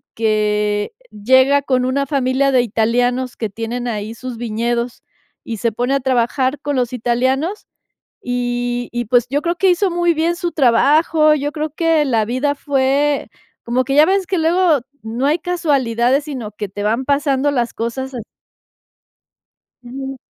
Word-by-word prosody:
que 210 -1 0 0.2
llega 260 +6 +3
con 255 -2 +1
una 275 +2 0
familia 270 0 +1
de 255 -2 +4
italianos 245 +3 0
que 220 -3 -3
tienen 230 +4 -4
ahí 215 -1 -4
sus 255 0 -7
viñedos, 235 +1 -2 0.4
y 230 - -5
se 230 +2 0
pone 245 +4 -1
a - - +2
trabajar 260 +2 0
con 290 -1 -2
los 245 -2 0
italianos, 260 - -1 0.6
y 245 0 -2
y, 240 -1 -3
pues, 245 +1 +3
yo 290 +2 0
creo 345 0 -1
que 380 0 +3
hizo 370 +1 +2
muy 345 -1 +1
bien 335 +2 0
su 345 -1 -3
trabajo, 305 +4 +4
yo 290 0 -2
creo 310 -1 -3
que 325 -1 +1
la 225 -4 +1
vida 265 +4 0
fue, 280 +1 +1 0.4
como 245 +2 +1
que 270 - -2
ya 305 +1 +7
ves 385 -1 +1
que 375 - 0
luego 330 -2 +3 0.2
no 235 +5 -2
hay 305 +4 +2
casualidades, 280 -6 +1
sino 250 -9 -6
que 210 -1 -5
te 205 +2 -6
van 230 +5 0
pasando 280 0 +1
las 245 -4 -1
cosas 260 +3 -4
así. 240 - -4 1.6
Ujú. 265 +2 -7
260 Hz, 160 wpm, -18 LUFS, 235-290 Hz, 1.6 s, ya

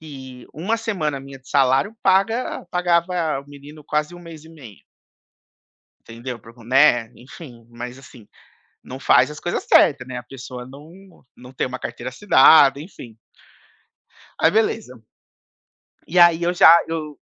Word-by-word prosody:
e 130 -5 -12
1 195 +9 -2
semana 180 -11 -3
minha 135 0 -12
de 130 +2 -22
salário 135 +9 +1
paga 200 +6 0
pagava 175 -3 0
o 145 - -25
menino 145 +2 -14
quase 150 +4 -2
1 175 - -12
mês 165 -3 -12
e 160 - -15
meio. 135 -11 -14 1.3
Entendeu? 120 +1 -8
Para 115 - -16
o - - -26
co 115 - -18
né, 120 -2 +3
enfim. 125 -2 -14
Mas 120 +2 -9
assim, 125 -5 -16 0.6
não 130 - -10
faz 150 - +3
as 150 - -10
coisas 175 - -4
certa, 140 -3 +3
né, 130 -1 -8
a - - -8
pessoa 125 -1 -10
não 165 +7 -16
não 125 +1 -14
tem 130 - -3
uma 130 +1 -7
carteira 125 +1 -7
assinada 140 -4 +5
enfim. 120 - -12 1.2
Aí 160 - +3
beleza. 215 - -1 1.1
E 180 +2 +1
aí 170 -1 +5
eu 175 +1 0
já 170 -1 +7
eu 155 -2 -6
145 Hz, 155 wpm, -20 LUFS, 125-170 Hz, 1.3 s, já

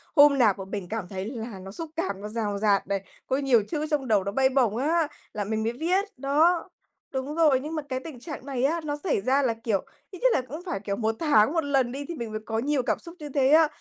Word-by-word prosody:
Hôm 290 -1 +7
nào 220 -6 +5
mà 195 - -6
mình 195 -2 -5
cảm 220 -4 -3
thấy 190 0 -5
là 225 -3 -6
nó 190 +1 -9
xúc 325 +9 -6
cảm, 330 - -2
nó 210 - -5
dào 210 -2 -2
dạt 200 -2 +2
này, 195 -1 -1 0.3
có 265 - +1
nhiều 265 -6 +3
chữ 305 -2 -1
trong 290 -4 -1
đầu, 210 -4 +3
nó 200 - -2
bay 265 +4 +3
bổng 250 -5 +2
á, 315 +5 +2 0.3
là 210 - -2
mình 220 +2 -2
mới 230 +2 0
viết. 360 +9 +1
Đó. 315 +7 +2 0.4
Đúng 270 +3 -3
rồi, 305 -6 +4
nhưng 305 +4 -5
mà 310 - -1
cái 255 -1 -1
tình 265 -2 -9
trạng 285 -1 -8
này 260 -3 -2
á, 325 +5 +2
nó 295 -1 -2
xảy 320 - +1
ra 260 +6 +3
là, 235 -3 +2
kiểu, 225 -3 -1 0.3
ít 370 - -9
nhất - - +4
là - - +2
cũng 285 +6 -8
phải, 345 - -2
kiểu, 200 0 -3
1 225 0 0
tháng 290 -4 +4
1 330 - +1
lần 270 -4 +1
đi 280 +3 -5
thì 340 - -5
mình 235 -5 -5
mới 215 - -4
có 225 0 -1
nhiều 280 +1 +1
cảm - - 0
xúc 335 +1 -11
như 300 -1 -7
thế 270 -1 +2
á. 315 +1 +7
260 Hz, 275 wpm, -26 LUFS, 220-300 Hz, 0.4 s, Hôm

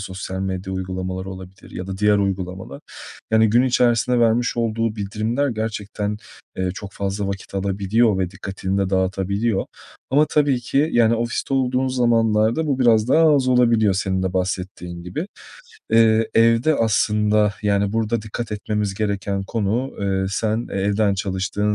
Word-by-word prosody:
sosyal 95 0 -6
medya 95 0 -3
uygulamaları 95 0 -4
olabilir 95 0 -11
ya 90 - -6
da 95 0 -6
diğer 105 0 +4
uygulamalar. 95 -6 -3 0.5
Yani, 110 -1 +4
gün 120 +3 +4
içerisinde 125 -1 +2
vermiş 120 +1 +2
olduğu 115 -1 -1
bildirimler 110 +7 -1
gerçekten, 105 -2 -3 0.4
eee, 95 0 -1
çok 100 0 -8
fazla 100 +1 -3
vakit 100 0 -6
alabiliyor 100 +2 +1
ve 90 -2 -1
dikkatini 95 +1 -4
de 95 -1 0
dağıtabiliyor 95 +3 0 0.5
ama 145 +3 +4
tabii 145 -4 +2
ki, 140 +5 +1
yani 115 -1 +4
ofiste 115 +3 -2
olduğun 130 0 +1
zamanlarda 115 +1 +2
bu 140 -3 0
biraz 115 -3 +3
daha 155 +2 +5
az 130 -2 +1
olabiliyor 115 -5 +3
senin 95 -1 -1
de 95 -1 -1
bahsettiğin 90 -2 -4
gibi. 90 - -5 0.6
Eee, 115 -1 +4
evde 115 +6 +4
aslında 105 -2 +2
yani, 100 -1 +1
burada 115 0 -1
dikkat 110 +1 -5
etmemiz 105 -1 -2
gereken 100 -1 -2
konu, 115 +5 -2
eee, 95 -1 0
sen 110 +3 -1
evden 100 +1 +1
çalıştığın 100 +2 -1
105 Hz, 145 wpm, -21 LUFS, 95-115 Hz, 0.6 s, daha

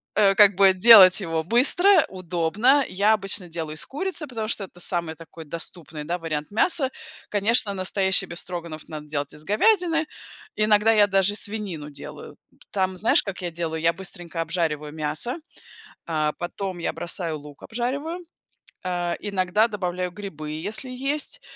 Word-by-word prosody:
э, 195 -2 +4
как 205 -1 +7
бы, 190 0 +6
делать 190 -1 +8
его 165 -3 -2
быстро, 300 - +4
удобно. 185 - +1
Я 200 +4 +2
обычно 195 -3 0
делаю 160 -2 -6
из 155 - -4
курицы, 330 +1 -3
потому 225 -4 -5
что 215 -2 -1
это 175 - -18
самый 170 -2 -2
такой 165 0 -12
доступный, 160 -1 -7
да, 175 +4 -3
вариант 155 -1 -5
мяса. 275 - +2 0.4
Конечно, 210 +1 +3
настоящий 190 0 +2
бефстроганов 170 -2 -6
надо 150 -1 -8
делать 145 -1 -4
из 150 - -13
говядины, 330 - +2 0.5
иногда 215 +1 +3
я 210 -2 +5
даже 195 0 +2
и - - -5
свинину 200 -9 -2
делаю. 145 - -10 0.4
Там, 190 -2 -1
знаешь, 220 - +3
как 195 -1 -6
я 175 -1 -4
делаю? 160 -1 -4
Я 165 0 +2
быстренько 175 -2 -6
обжариваю 165 -3 -2
мясо, 155 - -3 0.7
э, 155 -2 0
потом 185 +1 -5
я 170 - -2
бросаю 170 -2 -4
лук 145 -1 -14
обжариваю, 280 +9 -4 0.6
э, 175 -1 -2
иногда 200 +1 +1
добавляю 180 -4 -3
грибы, 165 -6 -8
если 205 - -2
есть. 280 - -2
185 Hz, 155 wpm, -24 LUFS, 165-215 Hz, 0.7 s, делать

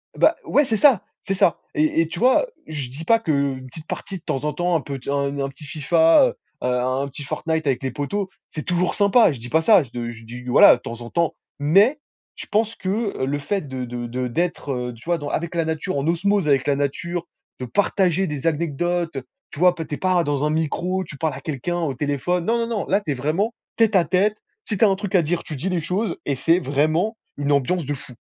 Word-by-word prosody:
Bah - - +4
ouais, 290 - +3
c'est 225 -3 0
ça, 260 -5 +5 0.2
c'est 195 - -1
ça. 175 -4 +3 0.2
Et 155 +2 +2
et 165 - 0
tu 165 - -6
vois, 260 - +4 0.2
je 145 -5 -4
dis 145 +6 -8
pas 230 +6 +4
qu'une 140 -8 -1
petite 160 +5 -11
partie 195 - -5
de - - -15
temps 135 - -2
en 150 - 0
temps, 175 0 0
un 160 - +2
pet 135 -2 -7
un 140 0 -1
un 135 0 -1
petit 140 +2 -12
FIFA, 165 - +4
heu, - - -4 0.3
heu, - - +1
un 125 +2 0
un 140 - -2
petit 140 +1 -9
Fortnite 160 +2 -2
avec 135 -1 0
les 130 - -1
potos, 185 - -2 0.2
c'est 155 - -6
toujours 180 0 0
sympa. 205 -1 +5
Je 135 - -7
dis 120 +2 -8
pas 160 - +3
ça, 185 0 +6
je 125 - -15
d 120 -1 -4
je 115 -1 -12
dis, 120 +2 -9
voilà, 125 - +7
de - - -21
temps 115 +1 -7
en 120 - -7
temps. 170 -1 0 0.3
Mais 200 - +4 0.4
je - - -8
pense 220 +2 +1
que 200 - -2
le 145 +2 -1
fait 195 +7 -1
de 130 -1 -4
de 120 0 -5
de 125 +1 -3
d'être, 155 +2 -2
heu, 125 -1 -3
tu 115 - -15
vois, 170 0 +1
dans 145 -2 -5
avec 170 +2 -3
la 165 -1 +1
nature, 160 +2 -2
en 140 +3 -1
osmose 195 +1 +1
avec 135 -3 +3
la 140 - +3
nature, 170 +5 -2 0.3
de 125 - -4
partager 190 - +1
des 150 0 -3
anecdotes, 165 +1 -1 0.3
tu 145 - -9
vois, 180 0 +5
p 160 -2 -5
tu 150 - -4
es - - -9
pas 185 -2 +2
dans 145 -1 0
un - - +1
micro, 170 +4 -1
tu 155 -4 -10
parles 160 +2 -1
à - - -8
quelqu'un 160 +2 -3
au 155 -5 -1
téléphone, 145 +6 -1
non, 235 +1 +2
non, 230 - -1
non, 225 -4 -2
là 200 +3 +2
tu 155 - -3
es - - +2
vraiment 155 - -1 0.2
tête 225 -3 +3
à 175 - +5
tête, 190 +6 +2 0.3
si 210 - -2
tu - - +2
as - - +6
un 195 - +2
truc 200 0 -5
à 175 - +6
dire, 165 +2 -1
tu 155 - -6
dis 155 +8 -3
les 180 -2 0
choses 185 +4 -2
et 140 - 0
c'est 165 +7 +3
vraiment 155 - +1 0.2
une 145 0 -1
ambiance 145 +4 +1
de 145 - -2
fou. 130 -3 -8
160 Hz, 255 wpm, -22 LUFS, 140-185 Hz, 0.4 s, voilà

